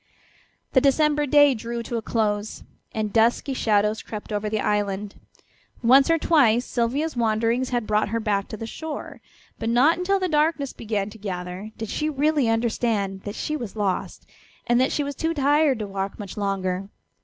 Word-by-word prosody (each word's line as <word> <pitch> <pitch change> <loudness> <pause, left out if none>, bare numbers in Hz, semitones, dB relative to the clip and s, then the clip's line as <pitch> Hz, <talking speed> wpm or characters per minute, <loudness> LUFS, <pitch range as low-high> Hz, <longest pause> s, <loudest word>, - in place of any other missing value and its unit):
The 260 - +5
December 295 +2 +3
day 290 0 +6
drew 235 0 -5
to 235 - -5
a 230 - -1
close, 210 -2 -2 0.3
and 215 -2 -3
dusky 235 +4 +2
shadows 210 -3 +1
crept 215 0 -7
over 210 +1 -1
the 215 0 -1
island. 205 -1 -1 0.7
Once 265 +5 +6
or 330 - +4
twice 250 -8 +3
Sylvia's 265 +7 -1
wanderings 230 +2 +1
had 240 -3 -1
brought 210 -1 +1
her 230 +2 -1
back 205 -3 -1
to 215 - -7
the 225 - -6
shore, 310 +6 -7 0.4
but 225 - -2
not 275 +9 +4
until 390 +2 +1
the 370 - 0
darkness 300 -3 +1
began 210 -2 -3
to 220 - -13
gather 185 0 -5
did 225 -2 -5
she 305 0 -1
really 295 -3 +1
understand 225 -4 0
that 205 +1 -5
she 305 - -2
was 235 -9 -6
lost, 200 -4 -2 0.4
and 240 +1 +3
that 260 - +2
she 295 - 0
was 285 0 -4
too 325 +4 -2
tired 290 -1 +3
to 215 - -4
walk 195 0 -4
much 200 -3 -8
longer. 195 -2 -2
230 Hz, 180 wpm, -24 LUFS, 210-280 Hz, 0.7 s, day